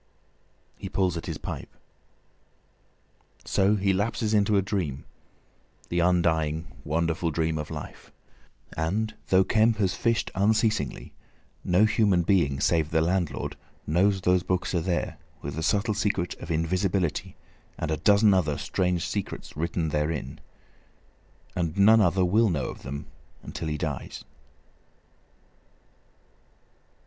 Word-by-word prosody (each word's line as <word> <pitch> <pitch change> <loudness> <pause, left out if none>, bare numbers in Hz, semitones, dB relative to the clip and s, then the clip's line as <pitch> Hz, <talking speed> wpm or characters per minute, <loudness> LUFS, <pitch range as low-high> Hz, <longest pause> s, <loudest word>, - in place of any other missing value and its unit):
He 95 - -6
pulls 90 -2 0
at 85 - -5
his - - -3
pipe. - - -6 1.8
So 100 +2 +2
he 100 -1 +1
lapses 110 +2 -1
into 105 0 +3
a - - +4
dream, 85 -9 -3 0.8
the 85 - 0
undying 80 -3 +2 0.2
wonderful 80 +2 0
dream 80 0 -1
of 75 - -4
his - - -6
life. - - -9 0.6
And 105 +8 -1
though 95 0 +5
Kemp 110 +3 +3
has 95 -3 +1
fished 115 +5 0
unceasingly, 105 - 0 0.5
no 90 +4 +4
human 105 -5 +3
being 80 -7 +2
save 80 0 +2
the 80 - +2
landlord 85 0 -1 0.3
knows 95 +5 +2
those 90 0 +3
books 90 0 -1
are 85 - +1
there, 85 +1 -2 0.2
with 70 - -4
the 80 - -4
subtle 105 +6 +1
secret 100 -4 -1
of - - -8
invisibility 85 +1 -1 0.4
and 80 - -3
a 80 - 0
dozen 100 +5 +5
other 75 -6 +1
strange 90 +2 -1
secrets 100 -2 -5
written 80 +1 -1
therein. 75 0 -2 1.2
And 85 -2 -2
none 110 +3 +6
other 90 -1 +3
will 110 +5 +3
know 75 -7 -1
of - - -9
them 70 +3 -6 0.4
until 80 - -5
he 75 -1 -2
dies. 75 -2 -5
90 Hz, 130 wpm, -26 LUFS, 80-100 Hz, 1.8 s, none